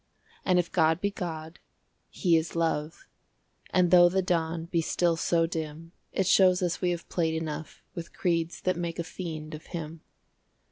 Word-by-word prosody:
And 185 -1 +3
if 175 -1 0
God 160 +1 +3
be 200 +2 0
God, 165 -3 -6 0.5
He 175 -3 +2
is 160 +1 0
Love; 160 -1 -1 0.6
And 180 -2 +3
though 175 -1 +8
the 190 +1 +1
Dawn 165 -2 -1
be 170 -1 0
still 170 +1 +1
so 165 0 +2
dim, 165 0 -5 0.2
It 190 - 0
shows 185 0 +5
us 175 0 -1
we 180 - +2
have 175 -1 -3
played 160 -2 0
enough 155 -1 -5
With 170 -1 -7
creeds 170 -2 -1
that 185 0 +1
make 170 -1 -3
a 170 - -1
fiend 160 -3 -6
of 155 +1 -9
Him. 160 0 -7
165 Hz, 175 wpm, -28 LUFS, 160-180 Hz, 0.6 s, though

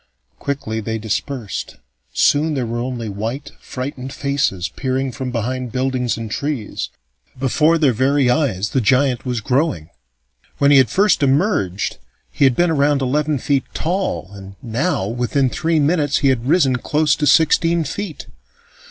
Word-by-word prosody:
Quickly 135 -6 -3
they 110 +1 -3
dispersed. 110 +2 -4 0.4
Soon 150 +1 +2
there 130 -3 -1
were 115 +1 -3
only 120 -2 -4
white, 110 +8 -5
frightened 130 0 -6
faces 140 -11 -1
peering 130 0 -2
from 125 +2 -5
behind 125 +1 -3
buildings 130 -1 -1
and 115 -2 -6
trees. 140 -4 -3 0.5
Before 150 +5 +3
their 145 -6 +3
very 135 +3 +2
eyes 125 -7 +1
the 130 - 0
giant 130 +2 +2
was 125 -3 -1
growing. 130 - -1 0.7
When 140 0 +4
he 140 - +7
had 130 - +4
first 200 -3 +3
emerged, 135 - +1 0.3
he 140 - +2
had 130 -2 +4
been 175 -1 +2
around 145 -2 +2
eleven 150 +3 0
feet 135 0 0
tall, 180 - -2
and 95 -1 -11
now, 120 - -1
within 125 +4 0
three 165 -2 0
minutes, 145 -1 +2
he 140 - +2
had 125 -2 0
risen 140 -5 +3
close 150 +3 +1
to 150 - 0
sixteen 165 +3 +4
feet. 195 0 -5
135 Hz, 150 wpm, -19 LUFS, 120-150 Hz, 0.7 s, he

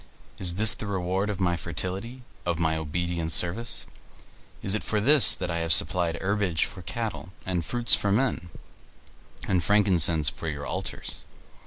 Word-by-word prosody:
Is 90 -2 0
this 110 +2 +3
the 110 - -8
reward 95 +1 -3
of 100 -2 -5
my 90 -2 -1
fertility, 95 +9 -5 0.2
of 85 -2 -3
my 80 -1 -1
obedient 80 +1 -5
service? 100 +8 -1 0.8
Is 100 - -1
it 110 - -2
for 105 - -3
this 140 +4 +6
that 90 -2 -6
I 85 - -3
have 85 -1 -2
supplied 85 -1 +6
herbage 95 -4 -2
for 95 -2 -12
cattle, 95 -3 -7 0.2
and 90 -2 -3
fruits 120 +7 +6
for 100 - +2
men, 110 -6 -2 1.0
and 90 -2 -1
frankincense 85 -5 +1
for 80 - -3
your 70 -1 -7
altars? - - -7
90 Hz, 160 wpm, -24 LUFS, 85-105 Hz, 1.0 s, this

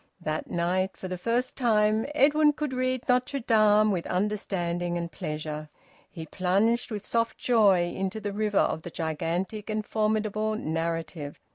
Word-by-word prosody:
That 155 -2 -3
night, 185 +3 0
for 185 - -6
the 185 0 -4
first 240 +6 -1
time, 215 -2 +2
Edwin 300 +1 +5
could 295 -2 -3
read 255 -1 -1
"Notre 250 +3 +1
Dame" 215 -2 +4
with 180 -4 -2
understanding 175 -3 -1
and 170 -1 -4
pleasure. 150 -1 -5 0.4
He 165 -3 -8
plunged 200 +8 +1
with 210 -2 -5
soft 230 -1 0
joy 205 -7 +4
into 195 +3 -3
the 205 -1 -4
river 210 -1 -1
of 160 - +2
the 175 - -7
gigantic 170 +7 -3
and 215 0 -2
formidable 215 0 0
narrative. 165 -4 -3
205 Hz, 150 wpm, -27 LUFS, 175-225 Hz, 0.4 s, Edwin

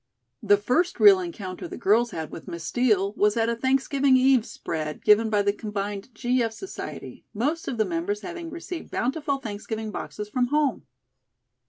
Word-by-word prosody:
The 205 - +4
first 300 - 0
real 400 -2 +8
encounter 210 - -6
the - - -8
girls 230 +5 +3
had 160 -7 -6
with 165 - -9
Miss 170 -2 -6
Steel 210 -5 +1
was 210 +1 +2
at 225 0 +2
a 235 - 0
Thanksgiving 270 +2 +2
Eve 255 -3 +4
spread 155 -2 -5
given 220 +1 +5
by 205 -1 +2
the 200 0 +2
combined 205 0 -4
G. 245 +3 +1
F. 230 -1 0
Society, 385 - -8
most 295 +10 -1
of 250 - -3
the 215 - +2
members 185 +4 -2
having 345 +1 -6
received 340 +1 -7
bountiful 280 +2 -1
Thanksgiving 220 -2 -5
boxes 210 0 -6
from 245 +3 0
home. 290 -4 0
230 Hz, 175 wpm, -25 LUFS, 205-270 Hz, -, real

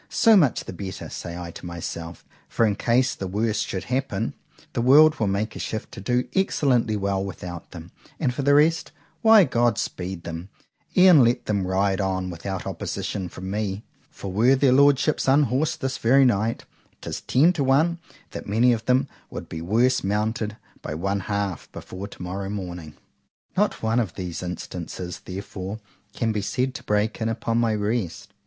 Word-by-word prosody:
——So 225 -1 +5
much 150 - +3
the - - -7
better—say 90 -2 -6
I 85 -1 -6
to - - -11
myself;—for 85 +5 -4
in 105 -2 +1
case 125 +4 +2
the 95 - -5
worst 105 +3 -1
should 95 - -4
happen, 125 -4 -2 0.4
the - - 0
world 150 +5 +6
will 110 - +1
make 100 +3 -1
a - - -6
shift 110 - -4
to - - -9
do 125 +5 +1
excellently 130 - +2
well 100 -1 -1
without 90 -3 -7
them; 85 0 -10 0.3
and 130 -6 0
for 140 - -3
the 140 +1 +4
rest,——why——God 160 - +3
speed 90 -1 -4
them——e'en 125 - +2
let 120 +1 +1
them 100 -3 0
ride 95 +1 +1
on 95 -1 -1
without 90 +3 -5
opposition 95 -3 -4
from 95 +2 -7
me; 105 0 -2 0.3
for 100 - -7
were 120 +8 +4
their 135 -1 +3
lordships 140 +2 +3
unhorsed 140 +1 +2
this 130 -1 -2
very 135 +4 +5
night—'tis 115 -1 -3
ten 155 +8 +3
to 150 - -1
one 155 +6 +2
but - - -25 0.2
that - - -7
many 120 +4 +4
of 115 -1 -3
them 130 +1 +3 0.2
would - - -7
be 80 - -6
worse 120 +9 +2
mounted 105 +2 -1 0.2
by 75 - -5
one 100 +5 -1
half 100 -1 -3
before 95 +2 -7
tomorrow 95 0 -6
morning. 90 -6 -6 0.6
Not - - 0
one 110 +2 +2
of 105 -9 -2
these 90 -3 -5
instances 90 0 -6
therefore 95 +1 -6 0.3
can 115 +1 -1
be 105 -1 -1
said 125 +6 -1
to - - -8
break 105 +2 0
in 110 - 0
upon 115 +1 -1
my 115 -2 +2
rest. 105 -4 -3
105 Hz, 170 wpm, -24 LUFS, 95-125 Hz, 0.6 s, world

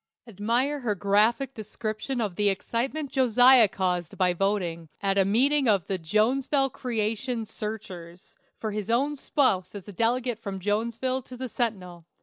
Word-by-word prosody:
Admire 235 +7 -1
her 225 -5 -1
graphic 215 +7 +2
description 215 +3 -4
of 205 -6 -2
the 205 +1 +2
excitement 260 +8 -2
Josiah 250 -2 +6
caused 180 -3 -2
by 180 -2 +2
voting, 175 -4 -2
at 195 0 +1
a - - +5
meeting 265 +7 +3
of 200 -6 +3
the 190 -1 -3
"Jonesville 260 - +1
Creation 225 0 -2
Searchers," 190 -6 -8 0.2
for 220 - -4
his 210 0 -4
own 275 +6 +1
spouse 210 - 0
as 200 -1 -9
a 205 - -9
delegate 235 +2 0
from 195 -2 -6
Jonesville 230 +6 -1
to 250 0 -11
the 260 +1 -4
"Sentinel." 185 -9 -4
220 Hz, 150 wpm, -26 LUFS, 195-250 Hz, 0.2 s, Josiah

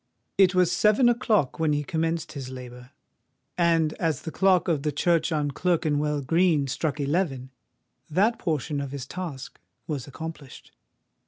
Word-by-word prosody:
It 190 -2 +4
was 180 -1 +4
seven 210 +7 +4
o'clock 225 - +1
when 160 -2 +2
he 145 0 0
commenced 165 +2 -2
his 135 -3 -7
labour; 125 -1 -10 0.7
and 165 -3 +2
as 160 -5 -1
the 160 - -5
clock 190 0 +3
of 160 -5 +1
the 150 +1 -1
church 165 +2 +1
on 150 -2 0
Clerkenwell 150 -2 0
Green 165 -1 +2
struck 145 +2 -2
eleven, 140 -3 -1 0.6
that 205 +9 +2
portion 150 -3 -2
of 140 - -4
his 135 -2 -5
task 155 -5 -7 0.3
was 145 -6 -4
accomplished. 150 -1 -9
155 Hz, 150 wpm, -26 LUFS, 140-175 Hz, 0.7 s, It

